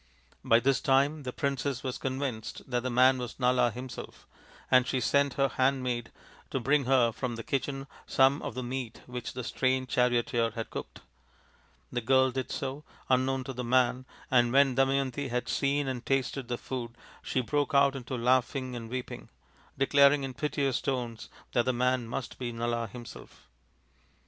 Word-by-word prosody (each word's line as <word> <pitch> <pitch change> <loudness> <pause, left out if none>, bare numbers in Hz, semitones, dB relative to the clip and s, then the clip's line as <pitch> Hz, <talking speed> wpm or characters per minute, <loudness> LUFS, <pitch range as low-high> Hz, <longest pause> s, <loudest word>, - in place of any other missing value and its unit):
By 115 - +5
this 135 +2 +2
time 140 +1 +2
the 130 -2 -4
princess 140 -1 -2
was 130 -2 -3
convinced 130 -4 -4
that 125 -2 0
the 130 - -2
man 130 +1 +5
was 125 0 -6
Nala 125 -1 +3
himself, 125 +3 -8 0.5
and 130 -1 +5
she 130 - 0
sent 140 +2 +2
her 135 0 +3
handmaid 130 -3 0 0.4
to 135 - -1
bring 140 +2 +2
her 125 -3 +4
from 120 +1 -4
the 115 - -6
kitchen 135 +1 -2 0.2
some 135 +2 +4
of - - -5
the 130 - -3
meat 125 -1 -5
which 125 -1 -6
the 125 - -5
strange 130 +1 0
charioteer 120 -2 +2
had 115 - -5
cooked. - - -7 0.9
The 120 - -1
girl 130 +2 +4
did 130 0 -3
so, 135 +2 -4 0.3
unknown 130 +1 +2
to 135 0 -6
the 125 0 -4
man, 125 +1 +2 0.2
and 120 -2 +4
when 135 0 +5
Damayanti 135 +1 +1
had 125 0 -2
seen 140 0 0
and 130 -2 -3
tasted 135 -1 -1
the 120 - -2
food 120 -3 -6 0.2
she 130 - -1
broke 145 +3 -1
out 140 0 +5
into 130 0 -5
laughing 130 +1 +1
and 115 -2 -7
weeping, 125 +1 -6 0.5
declaring 140 +1 +5
in 135 -1 -4
piteous 140 -1 -1
tones 125 -4 -3 0.2
that 120 -2 +2
the 130 - +1
man 125 0 +1
must 120 +1 -5
be 120 -2 -3
Nala 115 0 -2
himself. 120 +3 -12
130 Hz, 170 wpm, -29 LUFS, 120-135 Hz, 0.9 s, By